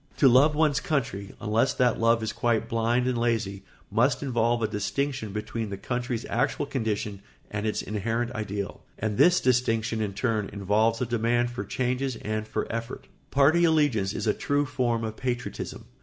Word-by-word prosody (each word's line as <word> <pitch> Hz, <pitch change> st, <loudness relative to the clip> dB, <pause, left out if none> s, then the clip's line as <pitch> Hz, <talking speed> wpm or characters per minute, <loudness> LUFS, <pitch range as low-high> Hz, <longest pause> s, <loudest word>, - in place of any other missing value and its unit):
To 140 Hz, -, +6 dB
love 135 Hz, +5 st, +5 dB
one's 150 Hz, -4 st, +3 dB
country, 105 Hz, -10 st, -2 dB
unless 115 Hz, +4 st, +1 dB
that 125 Hz, -2 st, +2 dB
love 115 Hz, 0 st, +3 dB
is 110 Hz, -, -2 dB
quite 120 Hz, -3 st, 0 dB
blind 115 Hz, +2 st, +1 dB
and 130 Hz, -1 st, +1 dB
lazy, 115 Hz, -5 st, -1 dB, 0.3 s
must -, -, +2 dB
involve 120 Hz, -3 st, +1 dB
a -, -, +2 dB
distinction 110 Hz, +3 st, -2 dB
between 105 Hz, +1 st, -4 dB
the 100 Hz, -, -5 dB
country's 120 Hz, +2 st, -3 dB
actual 135 Hz, +4 st, 0 dB
condition 105 Hz, -6 st, -2 dB, 0.3 s
and 105 Hz, +1 st, -2 dB
its 105 Hz, -, -1 dB
inherent 115 Hz, +3 st, -2 dB
ideal; 105 Hz, -4 st, -4 dB, 0.2 s
and 105 Hz, -1 st, -2 dB
this 180 Hz, +1 st, +6 dB
distinction 115 Hz, -3 st, +1 dB
in 100 Hz, -2 st, -2 dB
turn 110 Hz, -2 st, 0 dB
involves 105 Hz, +3 st, +1 dB
a -, -, +2 dB
demand 120 Hz, +1 st, +1 dB
for 120 Hz, -, -4 dB
changes 130 Hz, +1 st, -1 dB
and 110 Hz, 0 st, -3 dB
for -, -, -2 dB
effort. 115 Hz, +2 st, -5 dB, 0.2 s
Party 145 Hz, +5 st, +4 dB
allegiance 145 Hz, -, +3 dB
is -, -, -3 dB
a 105 Hz, -, +3 dB
true 145 Hz, 0 st, 0 dB
form 125 Hz, -4 st, 0 dB
of 110 Hz, -1 st, -4 dB
patriotism. 125 Hz, -1 st, -4 dB
115 Hz, 170 wpm, -27 LUFS, 110-130 Hz, 0.3 s, To